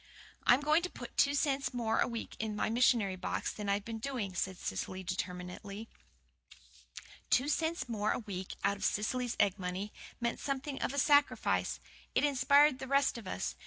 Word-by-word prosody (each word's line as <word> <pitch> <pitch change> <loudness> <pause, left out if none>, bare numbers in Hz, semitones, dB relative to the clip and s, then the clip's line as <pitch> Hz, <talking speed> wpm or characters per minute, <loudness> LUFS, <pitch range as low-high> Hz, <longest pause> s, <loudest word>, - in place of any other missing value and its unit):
"I'm 250 +3 +6
going 305 +3 +4
to 360 - -3
put - - -9
two 280 0 +4
cents 275 -3 0
more 225 -2 +1
a - - +3
week 230 -1 -5
in 215 -1 -2
my 215 - 0
missionary 230 -5 +3
box 185 - -2
than 205 -1 -4
I've 200 0 0
been 225 -1 -5
doing," 225 -6 -3
said 185 +1 -2
Cecily 185 +1 -4
determinedly. 180 +3 -5 1.4
Two 255 +3 +3
cents 320 +1 0
more 215 -2 0
a - - 0
week 190 -5 -6
out 200 +1 +2
of - - -8
Cecily's 245 +3 0
egg 205 -1 +3
money, 185 +3 -4 0.3
meant 235 -1 -1
something 275 0 -3
of - - 0
a 280 - -5
sacrifice. 285 +1 +3 0.4
It - - +3
inspired 280 0 +5
the 265 - -5
rest 275 -2 +2
of 215 - -11
us. - - -3
230 Hz, 180 wpm, -33 LUFS, 200-275 Hz, 1.4 s, I'm